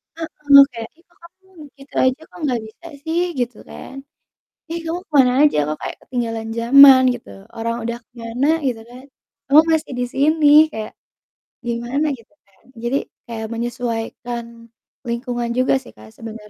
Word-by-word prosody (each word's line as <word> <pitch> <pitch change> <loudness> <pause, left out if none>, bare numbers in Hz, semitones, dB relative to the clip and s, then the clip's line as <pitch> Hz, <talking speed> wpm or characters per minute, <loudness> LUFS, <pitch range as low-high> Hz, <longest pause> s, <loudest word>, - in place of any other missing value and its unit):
Heeh, 295 -4 +5
kayak, 230 -1 -7
"Ih, 335 - -26
kok 345 - -31
kamu 375 +2 -19 0.3
gitu 275 +1 -16
aja 260 +4 +1
kok - - -13
nggak 245 -5 -1
bisa 335 +10 -14 0.2
sih?" 330 +2 -1 0.2
Gitu 245 -2 -2
kan. 270 - -10 0.8
"Ih, 335 - -3
kamu 330 +2 -3
ke - - -67
mana 250 -2 +5
aja, 290 - 0
kok 155 - -3
kayak - - -5
ketinggalan 230 -3 -4
zaman," 265 +2 +8
gitu, 245 - -11 0.3
"orang 230 +1 -2
udah 235 +1 -3
ke - - -69
mana," 230 +4 -2 0.2
gitu 240 -4 -2
kan, 250 +2 -12 0.4
"kamu 290 +3 +7
masih 315 -4 -1
di - - +1
sini." 300 +2 +3 0.2
Kayak 215 -1 -6 0.8
gimana, 240 +5 -2
gitu 230 +6 -22
kan. 195 -1 -32 0.2
Jadi 240 +3 0 0.3
kayak 225 -2 -5
menyesuaikan 235 0 -4 0.6
lingkungan 240 0 -3
juga 255 +1 +2
sih, 245 - -15
Kak, 110 0 -14
sebener 220 -2 -10
245 Hz, 165 wpm, -20 LUFS, 230-280 Hz, 0.8 s, zaman